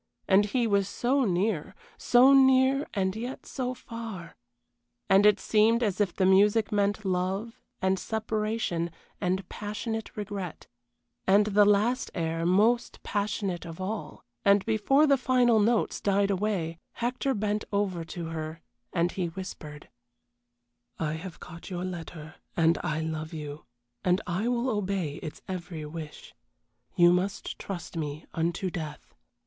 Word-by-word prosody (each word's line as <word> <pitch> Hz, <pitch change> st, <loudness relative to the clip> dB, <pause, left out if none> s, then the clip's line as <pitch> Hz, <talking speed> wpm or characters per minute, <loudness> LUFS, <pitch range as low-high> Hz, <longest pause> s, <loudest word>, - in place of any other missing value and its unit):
And 200 Hz, +1 st, +5 dB
he 240 Hz, +3 st, 0 dB
was 200 Hz, -3 st, +2 dB
so 260 Hz, +4 st, +1 dB
near, 190 Hz, -1 st, 0 dB, 0.2 s
so 255 Hz, +3 st, +5 dB
near 265 Hz, +1 st, +5 dB
and 190 Hz, -2 st, -1 dB
yet 245 Hz, +4 st, -6 dB
so 255 Hz, -1 st, -3 dB
far, 225 Hz, -9 st, -8 dB, 0.7 s
and 195 Hz, +2 st, +6 dB
it 210 Hz, -1 st, +4 dB
seemed 225 Hz, +4 st, +3 dB
as 210 Hz, -2 st, 0 dB
if 200 Hz, -3 st, +2 dB
the 190 Hz, -, +2 dB
music 205 Hz, +3 st, +4 dB
meant 205 Hz, 0 st, +1 dB
love 190 Hz, +5 st, -2 dB, 0.2 s
and 190 Hz, 0 st, +2 dB
separation 215 Hz, -5 st, -1 dB, 0.3 s
and 185 Hz, -1 st, -1 dB
passionate 220 Hz, +2 st, -5 dB
regret, 200 Hz, -5 st, -5 dB, 0.6 s
and 200 Hz, +2 st, +5 dB
the 205 Hz, 0 st, +4 dB
last 215 Hz, +5 st, +2 dB
air 165 Hz, 0 st, -1 dB
most 220 Hz, +6 st, +2 dB
passionate 200 Hz, -3 st, -2 dB
of 165 Hz, 0 st, -9 dB
all, 205 Hz, +3 st, -5 dB, 0.2 s
and 200 Hz, 0 st, +4 dB
before 225 Hz, +7 st, +3 dB
the 280 Hz, -3 st, +4 dB
final 245 Hz, -2 st, +4 dB
notes 225 Hz, +2 st, +1 dB
died 200 Hz, 0 st, +2 dB
away 185 Hz, -5 st, -1 dB
Hector 250 Hz, +3 st, -1 dB
bent 210 Hz, 0 st, -1 dB
over 200 Hz, -4 st, 0 dB
to 165 Hz, 0 st, -6 dB
her, 160 Hz, 0 st, -5 dB, 0.3 s
and 175 Hz, 0 st, +1 dB
he 180 Hz, -3 st, -2 dB
whispered: 165 Hz, -4 st, -8 dB, 1.1 s
"I 155 Hz, -2 st, -1 dB
have 165 Hz, +2 st, -7 dB
got 165 Hz, +1 st, -10 dB
your 180 Hz, -1 st, -3 dB
letter, 165 Hz, -3 st, -7 dB, 0.2 s
and 165 Hz, 0 st, +4 dB
I 155 Hz, +1 st, -1 dB
love 160 Hz, 0 st, -4 dB
you, 150 Hz, -1 st, -7 dB, 0.4 s
and 180 Hz, +1 st, +3 dB
I 185 Hz, +5 st, -1 dB
will 245 Hz, +1 st, 0 dB
obey 195 Hz, -, -1 dB
its 155 Hz, -, -8 dB
every 170 Hz, -4 st, -5 dB
wish. 155 Hz, 0 st, -8 dB, 0.6 s
You 175 Hz, 0 st, +6 dB
must 190 Hz, +3 st, -2 dB
trust 180 Hz, -3 st, -6 dB
me 150 Hz, -1 st, -4 dB
unto 170 Hz, +3 st, -1 dB
death. 155 Hz, -3 st, -7 dB
195 Hz, 145 wpm, -28 LUFS, 170-220 Hz, 1.1 s, and